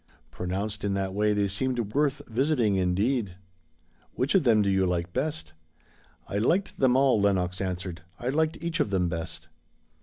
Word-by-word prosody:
Pronounced 100 +4 -4
in 100 -1 0
that 95 -1 -2
way 105 +1 +2
they 105 -1 +1
seemed 115 +1 -1
worth 145 0 +1
visiting 120 -3 +1
indeed. 95 +3 0 0.8
"Which 130 +3 0
of 190 -7 +3
them 110 -3 +5
do 100 - +1
you 95 -1 +2
like 90 0 -2
the - - +1
best?" 155 +2 -5 0.7
"I 100 - -2
liked 175 - 0
them 130 -2 +4
all," 130 -5 +4
Lenox 90 -2 +1
answered. 90 -2 -4 0.2
"I 120 - -3
liked 160 +3 +1
each 170 0 -2
of 150 - +1
them 90 -3 +1
best." 80 -1 -5
105 Hz, 175 wpm, -27 LUFS, 95-130 Hz, 0.8 s, them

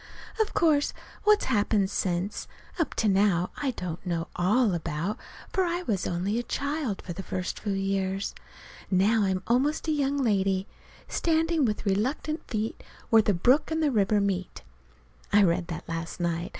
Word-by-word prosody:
Of 440 - 0
course 300 -3 +3 0.3
what's 420 0 +5
happened 205 -4 +1
since, 185 +2 -2 0.3
up 330 - 0
to 220 - +1
now, 190 -3 +3
I 285 - -1
don't 180 -8 -5
know 170 -2 -2
all 205 +4 +3
about, 170 +5 -2 0.3
for 380 -4 +2
I 350 0 -1
was 200 - -1
only 190 +6 -1
a 240 - -6
child 280 -7 -2
for 175 - -5
the 185 - -6
first 185 -1 -4
few 205 -2 -2
years. 195 0 -1 0.6
Now 205 +4 +3
I'm 190 -1 -1
almost 275 +7 +1
a - - +2
young 285 -2 +1
lady, 195 -6 +1 0.4
"standing 325 -2 +1
with 215 -2 -2
reluctant 255 - 0
feet 220 -1 -3 0.3
where 225 -1 +7
the 205 -2 +1
brook 255 - +3
and 320 0 0
river 210 -1 +3
meet." 190 -2 -2 0.7
(I 205 0 +6
read 170 -1 +2
that 170 -3 -6
last 165 +1 -5
night. 170 0 -1
205 Hz, 165 wpm, -27 LUFS, 185-270 Hz, 0.7 s, where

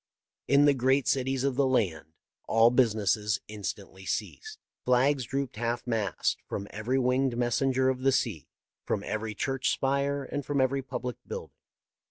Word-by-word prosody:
In 140 +1 +5
the 145 - +6
great 130 +1 +2
cities 135 0 +1
of 140 -1 +1
the 135 +1 +2
land 85 - 0 0.3
all 115 +1 +5
busi 125 -4 +3
ness 105 0 +1
instantly 100 -2 -6
ceased. 435 0 -4 0.3
Flags 130 +1 +3
drooped 135 -3 -3
half 120 +1 -2
mast 110 -5 0
from 100 - -4
every 110 +5 -1
winged 130 -1 +1
messenger 130 +2 +1
of 130 -1 +1
the 135 +1 +3
sea, 115 - -1 0.4
from 100 - -2
every 110 0 -3
church 135 +4 -1
spire, 140 +1 0
and 145 +1 -4
from 145 +1 -1
every 135 +1 +2
public 125 -1 -5
building. - - -6
125 Hz, 160 wpm, -28 LUFS, 110-135 Hz, 0.4 s, the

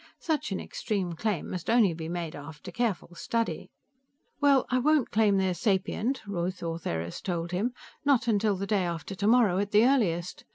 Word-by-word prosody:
"Such 310 -9 -2
an 190 - -1
extreme 190 -5 -3
claim 195 0 -2
must 180 -2 -4
only 225 -7 +4
be 160 0 -6
made 170 -2 -4
after 150 +1 -9
careful 215 -7 -2
study." 230 +6 -2 0.7
"Well, 280 -3 +4
I 255 - +3
won't 300 0 +2
claim 210 -2 +3
they're 190 -1 +1
sapient," 210 +7 0
Ruth 185 -2 -3
Ortheris 85 - -3
told 175 -2 -3
him. 205 +8 0 0.3
"Not 280 -5 +3
till 210 -3 +1
day 200 0 0
after 170 +2 -4
tomorrow, 205 -1 +3
at 200 0 -1
the 210 +2 +5
earliest. 185 -10 +1
195 Hz, 165 wpm, -28 LUFS, 175-230 Hz, 0.7 s, the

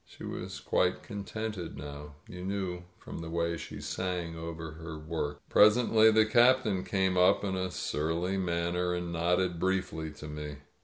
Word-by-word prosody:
She - - -14
was - - -5
quite 90 0 +1
contented 105 -5 -5
now; 75 +1 -8
you 90 0 -8
knew 95 -2 -3
from - - -8
the 85 0 -6
way 85 0 0
she - - -7
sang 90 -3 -3
over 80 -1 -6
her 80 0 -8
work. 75 -2 -3
Presently 110 +1 +6
the 110 0 +5
Captain 120 -4 +4
came 95 -2 +1
up 90 +3 +5
in 95 -2 -1
a 95 0 -1
surly 85 +3 -1
manner 90 -1 0
and 90 -1 -3
nodded 90 +1 +1
briefly 90 -4 -1
to 75 - -9
me. 75 -1 -6
90 Hz, 160 wpm, -30 LUFS, 80-95 Hz, -, Presently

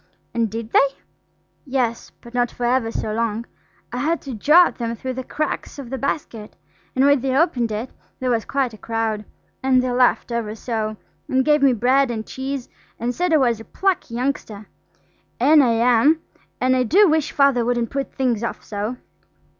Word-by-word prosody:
'" - - -43
"And 230 -2 0
did 225 +2 -6
they?" 275 - +5 0.8
"Yes, 255 -4 -2
but 235 - -13
not 245 -1 +1
for 240 - -4
ever 240 -1 +1
so 215 -1 -3
long, 230 0 -1 0.5
I - - -3
had 315 +6 0
to 270 - -6
jaw 300 - +6
at - - -4
them 230 -1 -2
through 260 +3 -5
the 260 +1 -5
cracks 305 +3 -4
of 265 -4 -8
the 265 - -2
basket. 235 -6 -4 0.4
And 260 +1 +4
when 285 -2 +4
they 265 0 0
opened 255 -8 +2
it 220 +4 -4 0.3
there 255 -1 0
was 230 -2 +1
quite 270 -4 -1
a 215 - -12
crowd, 225 -2 -2 0.4
and 260 -1 +3
they 255 0 0
laughed 250 0 +2
ever 225 -2 -2
so, 220 -2 -3 0.3
and 260 0 +1
gave 300 -1 +4
me 275 -2 +5
bread 255 +4 +3
and 220 -2 -4
cheese, 265 -1 -5 0.3
and 240 +2 -1
said 355 +5 -1
I 315 - +6
was 240 -5 +2
a - - -9
plucky 370 -6 -1
youngster–and 255 +3 -1
I 245 - +3
am, 245 +6 +4 0.4
and 255 +1 +3
I 255 - +2
do 375 - +5
wish 310 -2 +1
Father 275 -4 +3
wouldn't 240 -1 -1
put 275 0 -3
things 245 -4 0
off 230 - -4
so. 210 +4 -4
250 Hz, 195 wpm, -21 LUFS, 230-275 Hz, 0.8 s, jaw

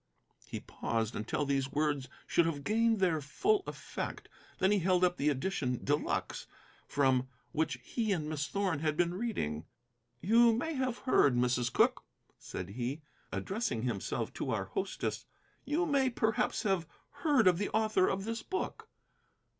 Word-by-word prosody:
He - - -4
paused 115 -1 -2
until 115 +7 -1
these 135 -1 0
words 145 -3 0 0.2
should 170 - +3
have 145 -4 -3
gained 225 +1 +2
their 170 -5 +2
full 390 - +1
effect. - - -5 0.3
Then 190 - +3
he 205 - +4
held 180 0 +2
up 180 -1 +3
the 150 - +2
edition 130 -4 -1
de 145 - +4
luxe - - -3 0.4
from 130 -2 +2 0.2
which 160 +1 0
he 225 -3 -1
and 160 -6 0
Miss 150 -2 -2
Thorn 195 -6 0
had 155 -1 0
been 175 0 +2
reading. 175 - -2 0.5
"You 230 +4 +5
may 285 +9 -1
have 260 -3 -1
heard, 145 - +4
Mrs. 125 0 +1
Cooke," - - +3 0.4
said - - -6
he, 125 +8 -4 0.3
addressing 190 - -2
himself 110 -8 -2
to - - -4
our - - 0
hostess, - - -3 0.4
"you 310 +6 +1
may 275 -3 +3
perhaps 225 -2 0
have 190 -5 +1 0.3
heard 285 -7 +4
of 180 -1 +5
the 205 - -1
author 215 -3 +2
of 195 +1 -1
this 225 0 -3
book." 380 - -4
175 Hz, 160 wpm, -32 LUFS, 140-225 Hz, 0.5 s, You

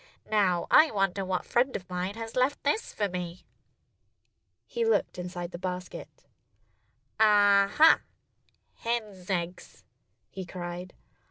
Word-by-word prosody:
Now, 190 -5 +2
I 315 - +7
wonder 195 -3 0
what 185 -1 -2
friend 255 +2 +1
of 180 - -5
mine 180 +2 -3
has 225 0 -7
left 255 +3 +1
this 290 +11 0
for 205 - -1
me!" 180 -1 -6 1.2
He 470 - -3
looked 450 - +1
inside 175 0 -5
the 175 - -7
basket. 180 0 -7 0.9
"Ah, 205 -2 +5
ha! 320 +1 +7 0.8
Hens' 215 -6 -4
eggs!" 180 -1 -4 0.5
he 190 - -6
cried. 175 0 -7
195 Hz, 120 wpm, -28 LUFS, 180-220 Hz, 1.2 s, I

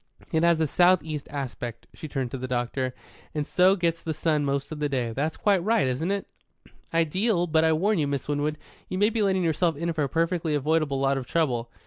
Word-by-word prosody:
It 160 - +2
has 170 -1 +4
a 160 - +3
south 175 +3 +4
east 150 -2 -5
aspect" 125 -4 -5
she 155 - -8
turned 135 -4 -3
to - - -4
the 130 - -4
doctor 125 +1 -2 0.4
"and 150 -1 -1
so 185 +4 +4
gets 170 -3 -1
the 160 -1 -3
sun 155 -1 +1
most 140 +1 -2
of 155 - -5
the 150 -1 0
day. 125 -4 -1
That's 150 +7 -2
quite 195 -4 +2
right, 210 -9 +2
isn't 130 +8 -1
it?" 200 0 -1 0.7
"Ideal. 175 +4 +1
But 160 -1 +2
I 160 0 +4
warn 195 +5 +1
you, 145 - +1
Miss 140 -2 -3
Winwood, 145 +1 -1 0.3
you 185 - -3
may 205 +3 +3
be 225 - -1
letting 190 -2 +2
yourself 165 0 +1
in 170 +2 -1
for 155 - -2
a 140 - -1
perfectly 165 0 0
avoidable 150 -1 +1
lot 135 0 +1
of 125 - -8
trouble." 125 -8 0
155 Hz, 225 wpm, -26 LUFS, 140-170 Hz, 0.7 s, has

